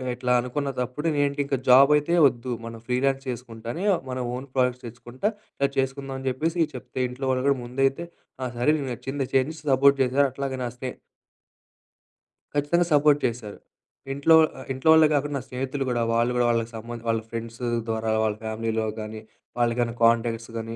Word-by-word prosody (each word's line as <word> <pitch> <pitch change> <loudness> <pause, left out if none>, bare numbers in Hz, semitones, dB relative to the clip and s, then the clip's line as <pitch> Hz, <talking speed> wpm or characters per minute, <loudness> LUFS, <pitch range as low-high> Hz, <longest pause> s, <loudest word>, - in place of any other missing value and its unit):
ఇట్లా 125 0 -2
అనుకున్న 140 +3 -2
తప్పుడు 125 +6 -2
నేఏంటి 145 0 0
ఇంకా 140 -1 -1
జాబ్ 135 +3 +8
అయితే 150 +3 -1
వద్దు. 125 -1 -4
మనం 115 0 -8
ఫ్రీలాన్స్ 135 +2 +1
చేసుకుంటా 115 -2 -7
అని 185 +5 -4 0.2
మన 125 - -3 0.2
ఓన్ 135 +2 -7
ప్రాడక్ట్స్ 125 -1 +1
తెచ్చుకుంటా 120 - -4 0.5
చేసుకుందామని 135 0 -2
జెప్పేసి 160 +5 0
చెప్తే 125 +1 -7
ఇంట్లో 130 +2 -5
వాళ్ళు 130 0 0
కూడా 140 - +2
ముందైతే 135 +6 0 0.4
"ఆ! - - -1
సరే 120 +5 +2
నేకు 140 -3 -4
నచ్చిందే 135 +2 -4
చేయని" 135 +4 +2
సపోర్ట్ 140 +1 +5
చేసారు. 135 +2 +2
అట్లాగే 135 0 -4
నా - - -1
స్నే 130 +1 -4 1.7
ఖచ్చితంగా 160 +5 +2
సపోర్ట్ 145 0 +5
చేశారు. 115 -4 -4 0.6
ఇంట్లో 140 +4 +5 0.2
ఆహ్, 130 - -9
ఇంట్లో 130 +5 0
వాళ్ళే 160 -1 +7
గాకుండా 145 0 0
నా - - -4
స్నేహితులు 135 +2 -3
గూడా 120 -1 0
వాళ్ళు 115 +1 +2
గూడా 120 -1 +2
వాళ్ళకి 115 -1 0
సంబ 115 +1 -8 0.2
వాళ్ళ 115 -1 +1
ఫ్రెండ్సు 115 +1 -6 0.2
ద్వారా 110 0 -1
వాళ్ళ 105 -1 0
ఫ్యామిలీలో 110 0 -2
గానీ 110 0 -6 0.4
వాళ్ళకైనా 120 0 +1
కాంటాక్ట్స్ 115 0 +2
గానీ 115 0 -5
130 Hz, 165 wpm, -25 LUFS, 115-140 Hz, 1.7 s, జాబ్